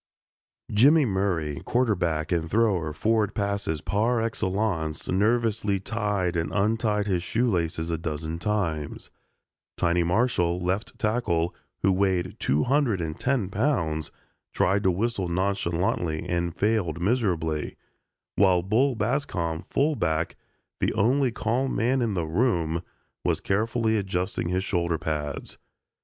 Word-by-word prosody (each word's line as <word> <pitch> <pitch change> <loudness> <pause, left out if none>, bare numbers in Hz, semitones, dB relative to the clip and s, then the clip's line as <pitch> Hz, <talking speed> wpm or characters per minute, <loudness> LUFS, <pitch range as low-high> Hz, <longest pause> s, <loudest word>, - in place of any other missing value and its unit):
Jimmy 140 +8 +5
Murray, 90 - -1
quarterback 90 -11 0
and 85 -2 0
thrower 100 -6 +2
of 75 0 -6
forward 110 -1 +1
passes 100 -7 -1
par 115 +4 +1
excellence, 95 -7 -1
nervously 105 0 +1
tied 100 -4 -1
and 80 -1 -1
untied 105 0 +1
his 95 -4 0
shoe 115 +7 0
laces 85 -4 -1
a 80 - -1
dozen 80 0 -4
times; 85 -8 -2 0.7
"Tiny" 85 0 +2
Marshall, 90 -2 +1
left 95 +7 -2
tackle, 105 -8 0 0.3
who 95 - +4
weighed 95 -1 0
two 75 +3 +1
hundred 130 -7 +2
and 80 -2 -4
ten 130 -7 +1
pounds, 95 - 0 0.4
tried 95 +3 +2
to 95 - +3
whistle 100 +1 0
nonchalantly 85 -3 -1
and 85 -1 -1
failed 100 -7 0
miserably, 85 -7 0 0.6
while 95 -3 +4
"Bull" 120 +8 +2
Bascom, 105 - -1
fullback, 85 - 0 0.4
the - - +1
only 125 +5 +3
calm 125 +3 -1
man 125 +4 +2
in 110 -4 0
the 85 -3 -1
room, 85 -3 +1 0.4
was - - +1
carefully 110 +2 +1
adjusting 95 -3 -2
his 90 +1 0
shoulder 85 -3 0
pads. 75 -3 -4
95 Hz, 125 wpm, -26 LUFS, 85-110 Hz, 0.7 s, Jimmy